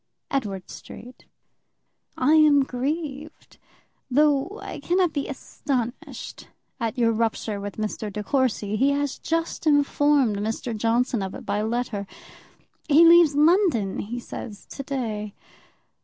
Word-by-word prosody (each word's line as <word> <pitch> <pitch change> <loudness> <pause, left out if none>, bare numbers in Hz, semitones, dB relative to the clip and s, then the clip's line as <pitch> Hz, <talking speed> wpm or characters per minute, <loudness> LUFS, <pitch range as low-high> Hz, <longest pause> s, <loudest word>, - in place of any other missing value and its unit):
_ - - -55 0.3
Edward 200 -8 -3
Street 250 +1 -12 0.9
I 275 +4 +3
am 300 -3 +6
grieved, 290 +3 -5 0.5
though 295 - +2
I - - -7
cannot 355 -2 +1
be 285 -2 -2
astonished 260 -3 -5 0.3
at 230 +1 -2
your 230 -2 +3
rupture 220 -2 -1
with 200 0 -6
Mr. 215 0 -3
De 210 +1 -5
Courcy; 220 -5 0
he 270 +5 +3
has 285 -1 -2
just 330 0 -2
informed 290 -5 +3
Mr. 220 +3 -3
Johnson 230 +1 +1
of 190 0 -4
it - - -9
by 205 +1 -1
letter. 220 -3 -2 0.8
He 310 +3 +7
leaves 335 -3 +7
London, 300 - +3
he 240 +4 -4
says, 210 -3 -8
to - - -6
day. 220 -7 -4
255 Hz, 130 wpm, -24 LUFS, 215-290 Hz, 0.9 s, He